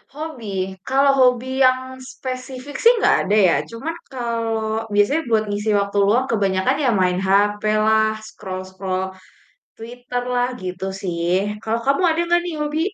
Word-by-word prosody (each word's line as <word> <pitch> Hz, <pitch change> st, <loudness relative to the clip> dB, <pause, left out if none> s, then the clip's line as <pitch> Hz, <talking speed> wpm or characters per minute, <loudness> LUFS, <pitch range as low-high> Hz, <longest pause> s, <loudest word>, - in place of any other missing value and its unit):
Hobi, 300 Hz, -7 st, -7 dB, 0.4 s
Kalau 275 Hz, +1 st, +4 dB
hobi 255 Hz, +1 st, +2 dB
yang 255 Hz, 0 st, +4 dB, 0.3 s
spesifik 255 Hz, +2 st, -7 dB
sih 470 Hz, -, +8 dB
nggak -, -, +4 dB
ada 205 Hz, -, +2 dB
ya. 170 Hz, -, +3 dB
Cuman 230 Hz, +8 st, -5 dB, 0.2 s
kalau 225 Hz, -3 st, -2 dB
biasanya 205 Hz, +11 st, +3 dB
buat 220 Hz, -2 st, +3 dB
ngisi 205 Hz, +2 st, -2 dB
waktu 200 Hz, 0 st, -2 dB
luang 240 Hz, +6 st, +3 dB
kebanyakan 200 Hz, +3 st, +1 dB
ya 260 Hz, -, +3 dB
main 180 Hz, 0 st, +1 dB
HP 205 Hz, +2 st, +3 dB, 0.2 s
lah, 220 Hz, 0 st, +3 dB
scroll-scroll 185 Hz, -1 st, -5 dB, 0.7 s
Twitter 245 Hz, +2 st, -5 dB
lah, 245 Hz, 0 st, +1 dB
gitu 185 Hz, 0 st, -5 dB, 0.2 s
sih. 170 Hz, -2 st, -2 dB, 0.4 s
Kalau 225 Hz, +1 st, -1 dB
kamu 275 Hz, +6 st, +2 dB
ada 325 Hz, -, -1 dB
nggak 345 Hz, 0 st, +4 dB
nih 350 Hz, -2 st, -4 dB
hobi? 300 Hz, +1 st, -1 dB
230 Hz, 150 wpm, -21 LUFS, 200-260 Hz, 0.7 s, sih